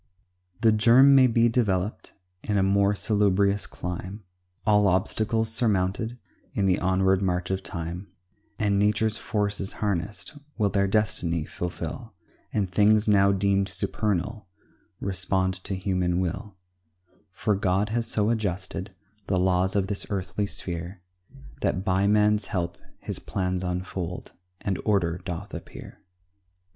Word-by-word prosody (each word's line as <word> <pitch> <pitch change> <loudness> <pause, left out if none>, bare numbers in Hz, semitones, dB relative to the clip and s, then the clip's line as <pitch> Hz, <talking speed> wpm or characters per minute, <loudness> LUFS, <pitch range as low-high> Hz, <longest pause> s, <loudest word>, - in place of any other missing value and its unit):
The 115 -1 +5
germ 120 +6 +6
may 130 -2 +7
be 115 0 +3
developed 105 -4 -1 0.3
In 105 -1 -1
a 95 - +3
more 100 +1 +3
salubrious 100 -1 +2
clime, 90 +4 -6 0.4
All 105 -1 +4
obstacles 110 +4 +1
surmounted 110 0 0 0.4
In 100 -4 +1
the 95 -1 +2
onward 95 0 +2
march 90 -1 -1
of 95 - -1
time, 85 +2 -6 0.5
And 100 -2 +1
nature's 105 +2 +2
forces 100 -2 -2
harnessed 100 - -3 0.2
Will 105 -3 +1
their 100 -1 +2
destiny 90 -6 0
fulfil, 90 +1 -6 0.4
And 100 -3 0
things 105 +3 +3
now 100 -2 +5
deemed 100 0 +1
supernal 105 +1 -1 0.5
Respond 95 0 0
to 95 - -2
human 90 -2 0
will; 95 +3 -3 0.8
For 105 - 0
God 95 +1 +1
has 115 +1 -1
so 105 +1 +1
adjusted 95 -2 -3 0.3
The 95 - +1
laws 90 +1 +2
of 100 -2 +2
this 100 0 -3
earthly 95 +1 -2
sphere, 90 -1 -3 0.6
That 95 +1 -1
by 95 +1 +2
man's 105 0 +3
help 85 -3 -3 0.2
his - - -4
plans 90 -1 -2
unfold, 90 -1 -4 0.3
And 100 -3 -2
order 90 -5 +1
doth 90 +4 -6
appear. - - -10
100 Hz, 130 wpm, -26 LUFS, 95-105 Hz, 0.8 s, may